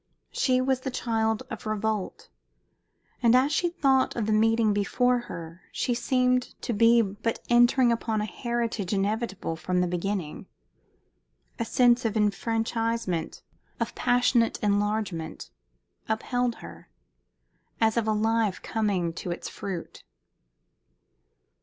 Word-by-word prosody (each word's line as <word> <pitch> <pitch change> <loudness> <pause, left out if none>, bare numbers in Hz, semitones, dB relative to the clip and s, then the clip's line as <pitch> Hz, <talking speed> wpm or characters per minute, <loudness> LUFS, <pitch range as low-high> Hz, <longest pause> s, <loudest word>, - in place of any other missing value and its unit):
She 255 -1 +2
was 260 0 +1
the 260 - -4
child 225 -2 -1
of - - -6
revolt, 215 -2 -3 0.9
and 235 -1 +5
as 265 +3 +4
she 345 +4 +1
thought 275 -6 +2
of 230 - -1
the 215 - 0
meeting 220 0 +3
before 245 +5 +1
her 170 +1 -8
she 245 - -1
seemed 250 0 0
to 240 - -1
be 230 +2 +5
but 205 +3 -3
entering 240 +1 +5
upon 225 -2 -1
a 210 - -1
heritage 230 -4 -3
inevitable 200 -3 -1
from 180 +2 -1
the 180 - +2
beginning. 180 -2 -3 1.1
A 230 - -1
sense 245 +1 +3
of 225 -1 -1
enfranchisement, 225 -2 -1 0.4
of - - -2
passionate 245 -1 +2
enlargement, 205 -5 -1 0.6
upheld 240 +2 0
her, - - -12 0.9
as 220 -1 +3
of 230 -2 0
a - - +3
life 220 -1 +1
coming 195 -6 -1
to 175 - -6
its 175 - -4
fruit. 185 -4 -7
225 Hz, 125 wpm, -27 LUFS, 205-240 Hz, 1.1 s, and